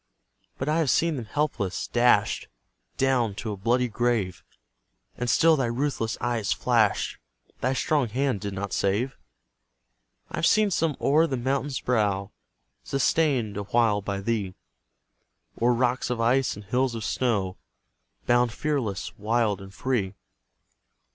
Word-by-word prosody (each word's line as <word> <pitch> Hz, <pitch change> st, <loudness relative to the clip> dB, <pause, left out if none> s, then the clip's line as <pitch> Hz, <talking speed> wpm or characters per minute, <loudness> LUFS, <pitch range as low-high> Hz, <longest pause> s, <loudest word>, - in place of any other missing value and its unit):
But 130 Hz, -, -3 dB
I 155 Hz, +2 st, +2 dB
have 155 Hz, -5 st, +1 dB
seen 165 Hz, +6 st, +2 dB
them 120 Hz, -4 st, -5 dB
helpless, 105 Hz, -8 st, -2 dB
dash'd 120 Hz, -3 st, +2 dB, 0.5 s
Down 125 Hz, -6 st, +1 dB
to 110 Hz, +1 st, -4 dB
a -, -, -3 dB
bloody 120 Hz, +6 st, +1 dB
grave, 115 Hz, -5 st, -1 dB, 0.7 s
And 120 Hz, 0 st, -3 dB
still 165 Hz, +4 st, +5 dB
thy 135 Hz, -5 st, 0 dB
ruthless 120 Hz, -2 st, -1 dB
eye 120 Hz, -1 st, 0 dB
has 105 Hz, -3 st, -2 dB
flash'd, 115 Hz, -5 st, +1 dB, 0.4 s
Thy 130 Hz, -, 0 dB
strong 140 Hz, -2 st, +1 dB
hand 130 Hz, -2 st, -1 dB
did 100 Hz, -2 st, -4 dB
not 100 Hz, +1 st, -4 dB
save; 110 Hz, +7 st, 0 dB, 1.2 s
I've 165 Hz, -, +1 dB
seen 215 Hz, -2 st, +3 dB
some 165 Hz, -4 st, 0 dB
o'er 155 Hz, +4 st, +3 dB
the 130 Hz, -, -2 dB
mountain's 135 Hz, +2 st, -1 dB
brow 105 Hz, -5 st, 0 dB, 0.5 s
Sustain'd 135 Hz, -6 st, +1 dB
awhile 105 Hz, +1 st, +1 dB
by 100 Hz, 0 st, -3 dB
thee, 100 Hz, -3 st, -2 dB, 1.1 s
O'er 120 Hz, +1 st, +4 dB
rocks 125 Hz, +1 st, +1 dB
of 125 Hz, -2 st, -2 dB
ice 120 Hz, +2 st, +2 dB
and 105 Hz, 0 st, -11 dB
hills 125 Hz, +3 st, 0 dB
of 115 Hz, -, -5 dB
snow 105 Hz, -7 st, -1 dB, 0.7 s
Bound 120 Hz, 0 st, +3 dB
fearless, 130 Hz, -7 st, -2 dB
wild, 110 Hz, -2 st, +1 dB
and 95 Hz, 0 st, -10 dB
free. 105 Hz, -3 st, -2 dB
120 Hz, 140 wpm, -26 LUFS, 105-135 Hz, 1.2 s, still